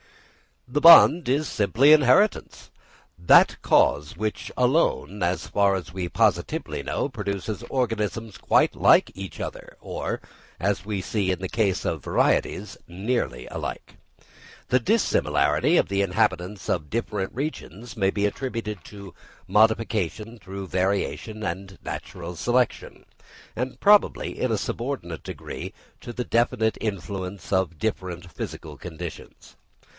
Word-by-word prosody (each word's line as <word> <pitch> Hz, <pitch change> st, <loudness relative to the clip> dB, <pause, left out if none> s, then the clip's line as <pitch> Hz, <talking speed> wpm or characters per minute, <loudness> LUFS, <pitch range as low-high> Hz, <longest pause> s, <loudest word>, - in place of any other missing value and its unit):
The 145 Hz, +4 st, -1 dB
bond 165 Hz, 0 st, +8 dB
is 145 Hz, +4 st, +1 dB
simply 120 Hz, +8 st, +3 dB
inheritance, 155 Hz, -, +2 dB, 0.5 s
that 85 Hz, -, +6 dB
cause 75 Hz, 0 st, +2 dB
which 110 Hz, +2 st, -3 dB
alone, 125 Hz, -, +1 dB
as 90 Hz, +1 st, 0 dB
far 100 Hz, -1 st, +2 dB
as 85 Hz, -3 st, -6 dB
we 90 Hz, -2 st, -3 dB
positively -, -, 0 dB
know, -, -, -2 dB
produces 100 Hz, -4 st, -4 dB
organisms 115 Hz, -3 st, -2 dB
quite -, -, +2 dB
like -, -, +4 dB
each 95 Hz, 0 st, -8 dB
other, -, -, -7 dB
or, -, -, -4 dB, 0.4 s
as 100 Hz, +1 st, -1 dB
we 105 Hz, -3 st, -3 dB
see 95 Hz, +1 st, -1 dB
in 90 Hz, -2 st, 0 dB
the 95 Hz, -1 st, -4 dB
case 100 Hz, -5 st, 0 dB
of -, -, -2 dB
varieties, -, -, 0 dB
nearly 95 Hz, -, -3 dB
alike. -, -, -6 dB, 0.7 s
The 130 Hz, -, +4 dB
dissimilarity 220 Hz, -, +2 dB
of -, -, +2 dB
the 100 Hz, 0 st, +1 dB
inhabitants 95 Hz, 0 st, -1 dB
of 75 Hz, -5 st, -1 dB
different 105 Hz, -4 st, -3 dB
regions 120 Hz, -, -6 dB
may 95 Hz, -2 st, +2 dB
be 100 Hz, +1 st, 0 dB
attributed 105 Hz, -, -4 dB
to 100 Hz, -3 st, -11 dB, 0.3 s
modification 110 Hz, 0 st, +1 dB
through 95 Hz, -1 st, -7 dB
variation 100 Hz, +3 st, -2 dB
and 95 Hz, +1 st, -5 dB
natural 90 Hz, 0 st, -7 dB
selection, 120 Hz, +7 st, -1 dB, 0.5 s
and 125 Hz, +2 st, -4 dB
probably 205 Hz, 0 st, +3 dB
in 130 Hz, -, 0 dB
a 110 Hz, -, +1 dB
subordinate 110 Hz, -, -4 dB
degree -, -, -7 dB, 0.3 s
to 120 Hz, -, -8 dB
the 125 Hz, -, -3 dB
definite 115 Hz, -1 st, +1 dB
influence 100 Hz, -1 st, -5 dB
of 95 Hz, -4 st, 0 dB
different 90 Hz, -3 st, -4 dB
physical 75 Hz, -1 st, -7 dB
conditions. 85 Hz, +2 st, -9 dB
100 Hz, 130 wpm, -24 LUFS, 95-120 Hz, 0.7 s, bond